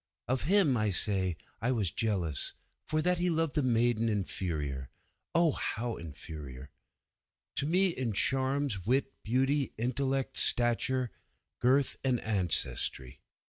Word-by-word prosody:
'Of 130 +1 -1
him, 180 -6 +4
I 110 -1 +1
say, 95 -3 +2 0.2
was 115 -7 +1
I - - -24
jealous, 90 - -1 0.3
for 155 0 0
that 180 0 +3
he 180 0 +1
loved 165 -3 0
a - - +2
maiden 120 -2 +2
inferior 80 - -3 0.5
Oh 170 -1 +5
how 120 -3 -3
inferior! 70 -4 -9 0.9
to 140 - +1
me 185 +4 +3
in 130 -8 -2
charms, 130 -2 0
wit, 135 +2 +1
beauty, 135 +5 0
intellect, 135 +3 -1
stature, 120 +1 +1 0.5
girth, 130 +2 +2
and 130 -3 +1
ancestry. 85 - +1
120 Hz, 125 wpm, -30 LUFS, 95-135 Hz, 0.9 s, Oh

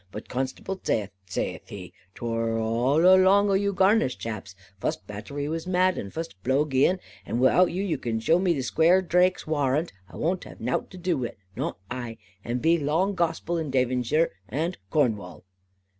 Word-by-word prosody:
But 105 - -8
Constable 135 +9 -4
zaith, 105 -2 0 0.2
zaith - - -3
he, 95 -3 -9 0.2
'Twor 115 -1 -1
all 120 +8 +2
along 190 +2 +6
o - - +3
you 200 +1 +2
Garnish 190 - +3
chaps, 105 -4 -6 0.2
fust - - -3
battery 105 +8 -5
was 165 +3 -3
mad, 185 0 +3
and 100 - -6
fust 160 - -6
blow 135 +7 +2
gien, 145 +6 +2 0.2
and 115 - -3
wi'out 150 +8 +4
you 185 -1 -1
can 115 -2 -2
zhow 165 +10 +3
me 175 -6 +1
Squaire 170 +8 +4
Drake's 180 +1 +2
warrant, 150 +1 0 0.2
I - - -13
wunt 180 +4 -1
have - - -12
nout 125 +3 -2
to 185 - -11
do 175 -4 -1
wi' 120 - -1
it, - - -14 0.2
not - - -3
ai; 120 -2 -5 0.3
and 120 +1 -2
that - - -12
be 165 +1 +4
law 155 +5 +1
and 200 0 -3
gospel 170 0 -1
in 155 -3 -3
Davonsheer 130 +4 +1 0.2
and 160 +9 -1
in - - -17
Cornwall. 100 - -1
150 Hz, 190 wpm, -26 LUFS, 120-180 Hz, 0.3 s, along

